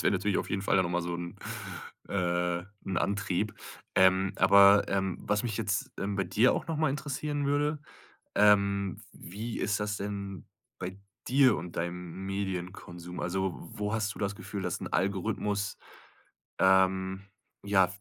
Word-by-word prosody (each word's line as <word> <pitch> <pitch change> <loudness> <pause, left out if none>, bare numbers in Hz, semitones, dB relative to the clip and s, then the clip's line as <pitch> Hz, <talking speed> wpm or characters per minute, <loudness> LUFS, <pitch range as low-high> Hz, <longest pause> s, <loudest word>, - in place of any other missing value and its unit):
das - - 0
wäre - - +3
natürlich 100 +1 +1
auf - - -4
jeden 95 -1 -1
Fall - - +2
dann 95 - +4
noch 85 - -2
mal 90 0 0
son 85 0 -4 0.7
'n, - - -5
äh 90 -2 0 0.2
'n 95 - -3
Antrieb. 100 +1 -1 0.4
Ähm, 95 +1 +4
aber, 100 +1 +7
ähm, 95 -2 0
was 105 0 0
mich 115 -4 -2
jetzt, 105 -3 -1
ähm, 100 0 -2
bei 95 - +1
dir 105 +8 +4
auch - - -3
noch 165 -1 -2
mal 155 -2 +2
interessieren 145 +1 -2
würde, 145 +1 +1 0.6
ähm: 100 -2 +4
Wie 110 +6 -6
ist 105 0 0
das 105 0 -1
denn 100 -3 -5 0.3
bei 95 +1 -6 0.3
dir 130 0 +5
und 85 0 -7
deinem 90 +2 -4
Medienkonsum? 90 -2 -5
Also, 95 +1 -1 0.2
wo 105 0 -2
hast 110 -2 0
du - - -12
das 100 0 -1
Gefühl, 100 +1 -6
dass 90 -1 -2
'n - - -3
Algorithmus, 100 +1 -1 0.8
ähm 95 0 +3 0.4
ja, 95 -2 +4
100 Hz, 165 wpm, -30 LUFS, 95-105 Hz, 0.8 s, aber